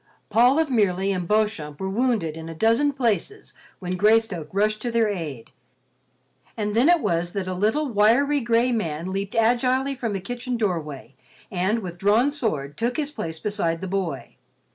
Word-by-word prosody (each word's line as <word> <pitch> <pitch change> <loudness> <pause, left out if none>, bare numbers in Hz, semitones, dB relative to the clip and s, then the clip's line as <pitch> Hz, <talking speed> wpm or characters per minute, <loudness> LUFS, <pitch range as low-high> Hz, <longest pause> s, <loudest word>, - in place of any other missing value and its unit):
Paul 245 +6 +5
of 320 -3 +1
Merely 195 -4 +2
and 180 -3 -2
Beauchamp 210 -9 0
were 190 - -3
wounded 210 -6 0
in 160 0 -8
a 165 - -7
dozen 230 - +3
places 265 - -2 0.2
when 185 -1 -4
Greystoke 210 -6 +2
rushed 215 +2 0
to 245 - -2
their 230 -1 +2
aid, 155 - -5 1.1
and 210 -1 -2
then 250 +8 +4
it 350 -2 +4
was 170 +1 -1
that 195 -2 -3
a 185 - -2
little, 220 +11 +1
wiry, 245 +6 +3
gray 235 +1 +2
man 170 -6 -2
leaped 195 +1 -4
agilely 250 +4 +2
from 240 -5 -3
the 195 - -2
kitchen 245 +5 -4
doorway, 155 - -3 0.4
and 195 +5 0
with 175 -1 -7
drawn 220 +8 +3
sword 150 - -3
took 240 +2 -1
his 300 -2 -2
place 160 - -5
beside 170 -5 -1
the 190 - -5
boy. 180 -7 -4
210 Hz, 175 wpm, -24 LUFS, 180-240 Hz, 1.1 s, Paul